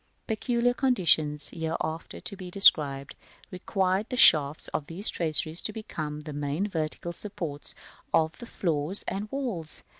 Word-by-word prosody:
Peculiar 240 +2 0
conditions, 165 - +2
hereafter 160 0 -4
to - - -8
be 185 -2 -9
described, 145 -8 +4 0.4
require 190 +1 0
the 250 - -4
shafts 150 - +6
of 145 - -4
these 185 +6 +1
traceries 160 0 +2
to - - -3
become 155 -9 -6
the 150 -1 -8
main 145 +7 -2
vertical 165 -1 -4
supports 170 -7 -7 0.4
of 160 +1 +1
the 240 - -9
floors 165 0 -2
and 200 +3 -4
walls. 230 - -5
170 Hz, 140 wpm, -27 LUFS, 150-205 Hz, 0.4 s, shafts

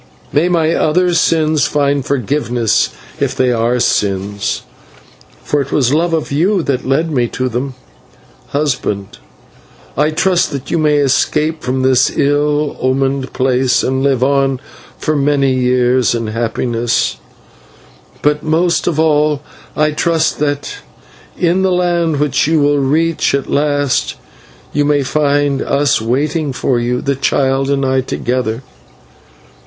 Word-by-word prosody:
May 160 +5 +2
my 165 -2 +2
other 175 +3 +2
sins 155 -5 +2
find 140 -1 0
forgiveness, 125 -3 0 0.3
if 140 -2 -1
they 130 -2 +2
are 120 +1 +1
sins, 100 -2 -1 0.8
for 145 - 0
it 140 - -6
was 130 -3 +2
my 150 - +3
love 170 +1 0
of 155 - -3
you 180 +6 +1
that 130 -3 -2
led 160 +5 +1
me 125 -5 +1
to 130 +2 -3
them. 130 +2 -3 0.7
Husband, 125 -9 -2 0.8
I 150 +3 +2
trust 175 +3 +1
that 140 -2 -6
you 170 - +1
may 150 -1 +2
escape 150 +3 +1
from 130 +1 -2
this 130 -1 +3
ill 145 +1 +1
omened 135 +1 0
place, 130 -1 +1
and 130 +1 0
live 135 -2 +1
on 135 -1 +1 0.4
for 155 - -1
many 140 -2 +2
years 125 -1 +2
in 115 -1 -2
happiness; 115 - -1 1.1
but 150 0 +2
most 165 +3 +1
of 155 -3 0
all 150 -2 +2 0.3
I 150 0 +2
trust 165 +1 0
that 145 -1 -2 0.6
in 175 +2 +1
the 190 -1 +2
land 170 -4 +1
which 145 -1 +1
you 160 0 +2
will 145 0 +2
reach 155 +3 +1
at 140 - -3
last, 145 -2 0 0.6
you 145 - +1
may 145 -1 +2
find 145 -1 +1
us 140 -4 +1
waiting 145 +5 -1
for 125 -1 0
you, 125 +1 -1
the 140 0 -1
child 135 0 0
and 140 -1 0
I 130 0 +1
together. 125 -2 -2
140 Hz, 140 wpm, -15 LUFS, 130-150 Hz, 1.1 s, my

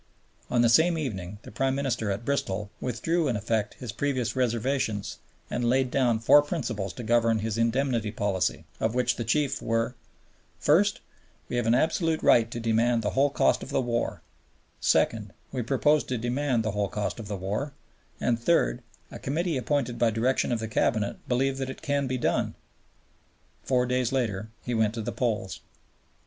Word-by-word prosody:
On 120 -1 +3
the - - +5
same 165 +9 +4
evening 105 - -4
the - - -10
Prime 135 +5 0
Minister 125 -6 -1
at 100 +4 -3
Bristol 105 -7 -1
withdrew 155 +7 0
in 125 - 0
effect 105 0 -1
his 125 -4 -6
previous 130 -3 -1
reservations 120 -3 -1 0.3
and 120 - -2
laid 130 0 +2
down 125 -4 +2
four 115 +6 +6
principles 120 - -3
to 120 - -7
govern 115 0 +3
his 110 0 -2
Indemnity 115 -1 +1
Policy, 100 -4 -1
of 110 +2 0
which 125 0 +2
the 120 - -2
chief 140 +5 0
were: 115 +2 0 0.6
First, - - +3 0.5
we - - -3
have 120 -2 0
an 115 - +4
absolute 160 +3 +1
right 115 -1 +5
to 120 - -5
demand 115 +1 +2
the 105 - 0
whole 140 +2 +3
cost 140 - +2
of - - -8
the - - +1
war; 120 -2 -2 0.6
second, - - +1 0.2
we 130 - -2
propose 140 +5 +2
to 125 - -2
demand 120 +1 0
the 110 - -1
whole 100 -1 -1
cost 105 +2 -3
of 110 - -7
the 100 -1 -3
war; 105 +10 -3 0.5
and 120 -1 +1
third, 125 -1 +2 0.3
a - - -8
Committee 165 +4 -1
appointed 130 -2 -1
by 120 - +4
direction 120 +5 +1
of 120 - +1
the 110 - -3
Cabinet 110 -1 0
believe 135 +2 +1
that 135 -1 -2
it 130 - -8
can 140 -2 0
be 130 0 -1
done. 120 - 0 1.1
Four 125 -1 +1
days 125 0 0
later 110 -6 -1 0.2
he 125 - -2
went 110 -1 +1
to 115 - -3
the - - -3
polls. 110 -6 -2
120 Hz, 180 wpm, -27 LUFS, 110-135 Hz, 1.1 s, four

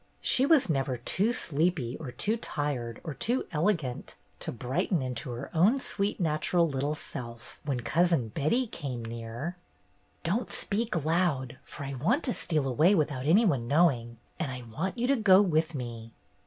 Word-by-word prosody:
She 265 +2 +4
was 315 -4 +5
never 135 -5 0
too 195 - +1
sleepy 155 - 0
or 145 - -6
too 205 - 0
tired 140 - -3
or 160 - -5
too 235 - -1
elegant 155 - -1 0.2
to - - -4
brighten 155 - -1
into 125 -1 -4
her 120 +3 -6
own 195 +11 +4
sweet 205 -5 0
natural 165 +1 +2
little 145 +1 -1
self 120 -5 -8
when 135 -4 -1
Cousin 160 -1 +2
Betty 155 - +1
came 130 - -5
near. 115 +9 -6 0.7
"Don't 205 +9 -1
speak 200 -7 +1
loud, 155 -7 0
for - - -9
I 140 0 -5
want 175 - +1
to 250 - 0
steal 155 -5 -1
away 155 +10 +4
without 145 -5 -1
any 200 +9 +5
one 135 - +1
knowing, 125 -6 +2 0.2
and 155 -6 -2
I 125 -1 -6
want 155 - -4
you 240 - 0
to 275 +2 +3
go 200 -6 +6
with 165 -5 +1
me." 115 -3 -6
150 Hz, 170 wpm, -29 LUFS, 125-185 Hz, 0.7 s, go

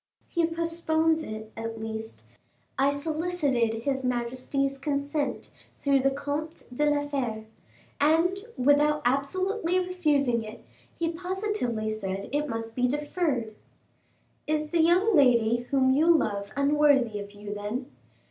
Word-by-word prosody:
"He 335 -2 +1
postpones 330 -1 +1
it, 215 -5 -7
at 225 0 -5
least. 220 0 -6 0.5
I 275 +1 +3
solicited 285 -7 -1
his 270 -1 -1
majesty's 255 +3 -1
consent 285 +1 -2 0.3
through 280 -1 +3
the 270 +1 +3
Comte 290 +4 -4
de 295 +4 +2
la 290 0 0
Fere, 240 -6 -3 0.5
and, 330 +6 +3 0.2
without 295 +3 +3
absolutely 360 - 0
refusing 300 -10 +1
it, 215 +1 -10 0.3
he 330 0 0
positively 360 - -2
said 195 -2 -3
it 295 +1 -1
must 225 -1 -4
be 250 0 +2
deferred." 290 -4 -1 0.9
"Is 305 0 -1
the 340 -1 +3
young 360 +6 +4
lady 240 -4 +4
whom 265 -1 +3
you 305 +5 +3
love 205 -11 +2
unworthy 280 -6 +3
of 205 0 -8
you, 205 0 -7
then?" 210 +5 -4
280 Hz, 130 wpm, -27 LUFS, 235-320 Hz, 0.9 s, young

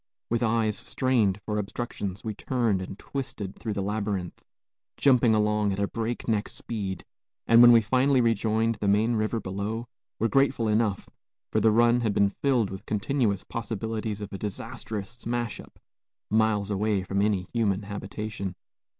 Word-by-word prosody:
With 115 - +1
eyes 110 -2 +1
strained 115 -7 +1
for 105 -1 -1
obstructions, 100 -2 -4
we 110 - -3
turned 115 -3 0
and 95 +1 -7
twisted 110 -8 -5
through 110 -2 -3
the 100 - -2
labyrinth, 100 -3 -3 0.5
jumping 125 -5 +4
along 105 -1 +2
at 95 - -2
a 100 - +1
breakneck 115 -1 -2
speed; 100 -5 -4 0.4
and, 115 +1 +7
when 120 0 +10
we 115 -1 +7
finally 130 +4 +3
rejoined 115 -1 +1
the 105 - 0
main 105 +4 +3
river 110 +1 0
below, 105 +4 -4 0.3
were 115 - +1
grateful 135 -3 +2
enough, 105 -2 +1 0.4
for 110 - +2
the 110 +1 +4
run 120 +2 +4
had 110 -3 0
been 100 -1 +3
filled 120 -5 +1
with 95 - -8
continuous 105 -2 0
possibilities 110 -1 -4
of 105 0 -7
a 100 - -5
disastrous 110 0 -5
smash 120 -1 -3
up, - - -13 0.5
miles 105 -2 +2
away 100 -1 0
from 100 +1 -1
any 100 -3 +1
human 105 -4 +1
habitation. 100 -1 -5
110 Hz, 160 wpm, -27 LUFS, 100-115 Hz, 0.5 s, when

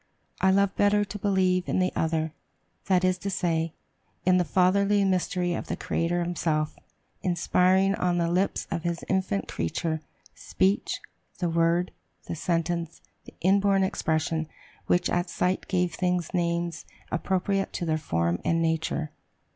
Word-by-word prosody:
I 190 - +5
love 200 0 +3
better 205 0 +3
to 205 +1 -7
believe 185 -2 +1
in - - +1
the 185 0 +2
other; 160 -1 0 0.5
that 185 -1 +3
is 185 0 +2
to 200 - -3
say, 165 -4 -1 0.5
in 185 0 +5
the - - +3
fatherly 195 +5 +3
mystery 180 -1 0
of - - -4
the - - -2
Creator 175 +1 -1
himself, 160 -3 -1 0.5
inspiring 185 +2 +3
on 180 -3 0
the 170 -1 +1
lips 180 +3 0
of 170 - -1
his 170 0 -3
infant 185 - 0
creature, 160 - -2 0.3
speech; 195 +2 0 0.4
the 175 -3 -1
word, 170 +2 +2 0.3
the - - -4
sentence, 170 0 -1 0.3
the - - -14
inborn 195 +1 +3
expression, 160 -3 0 0.4
which 175 0 +3
at 175 0 0
sight 180 +2 -1
gave 180 -2 0
things 180 -1 -1
names 170 -1 -1 0.3
appropriate 190 +2 0
to 175 - -3
their 155 -1 0
form 85 - -1
and 165 - +1
nature." 160 -1 -1
175 Hz, 145 wpm, -27 LUFS, 165-190 Hz, 0.5 s, I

